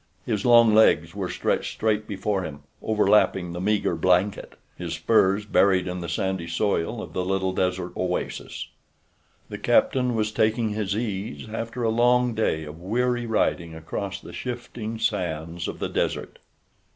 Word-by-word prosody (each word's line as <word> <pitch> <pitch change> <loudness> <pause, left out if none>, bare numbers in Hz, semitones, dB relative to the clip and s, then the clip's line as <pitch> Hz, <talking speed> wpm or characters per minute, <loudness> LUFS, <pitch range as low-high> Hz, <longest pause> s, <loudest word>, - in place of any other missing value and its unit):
His 105 -2 -1
long 115 -2 +7
legs 110 +1 +4
were - - -3
stretched - - -1
straight 110 -1 0
before 100 0 -1
him 70 -5 -7 0.2
overlapping 105 -4 +2
the 90 - -4
meager 105 -3 +1
blanket, 90 +4 +1 0.2
his - - -4
spurs 100 +2 +3
buried 95 -3 +3
in 90 0 -4
the 85 - -5
sandy 95 0 -2
soil 85 0 -1
of - - -10
the 90 - -1
little 95 0 0
desert 90 -1 -1
oasis. 90 -1 -3 0.8
The - - -6
captain 125 -2 +2
was 110 -1 0
taking 110 +1 +1
his 105 -1 -2
ease 110 -1 -4
after 115 +2 -4
a 115 - +2
long 120 +1 +3
day 110 -8 0
of 75 +2 -10
weary 120 +5 0
riding 85 -6 0
across 95 +4 -5
the - - -12
shifting 120 -3 -5
sands 85 -6 -2
of - - -5
the - - -2
desert. - - -2
100 Hz, 155 wpm, -25 LUFS, 90-110 Hz, 0.8 s, long